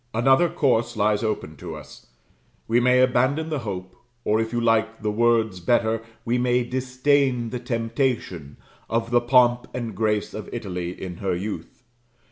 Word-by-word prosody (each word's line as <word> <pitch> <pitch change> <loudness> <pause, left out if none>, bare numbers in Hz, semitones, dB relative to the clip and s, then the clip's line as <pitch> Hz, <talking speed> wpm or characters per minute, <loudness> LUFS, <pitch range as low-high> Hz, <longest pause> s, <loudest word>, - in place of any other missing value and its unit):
Another 135 +8 +4
course 120 -6 +1
lies 105 0 +2
open 105 -8 -3
to - - -7
us. - - -13 0.6
We 115 +2 +3
may 125 +1 +4
abandon 130 +5 +2
the 150 - -1
hope 95 -5 -6 0.3
or 110 +1 +2
if 110 - -3
you 120 - 0
like 115 -1 +1
the 105 - 0
words 110 -3 +2
better 115 +4 +1 0.2
we 120 +2 +1
may 125 0 +2
disdain 130 -1 +1
the 125 - -3
temptation, 115 - -2 0.3
of 115 0 -1
the 120 0 +4
pomp 120 0 +3
and 120 -3 -4
grace 105 0 0
of - - -7
Italy 90 -2 -4
in 90 -2 -6
her 95 -2 -1
youth. 95 +2 -6
115 Hz, 160 wpm, -24 LUFS, 105-125 Hz, 0.6 s, Another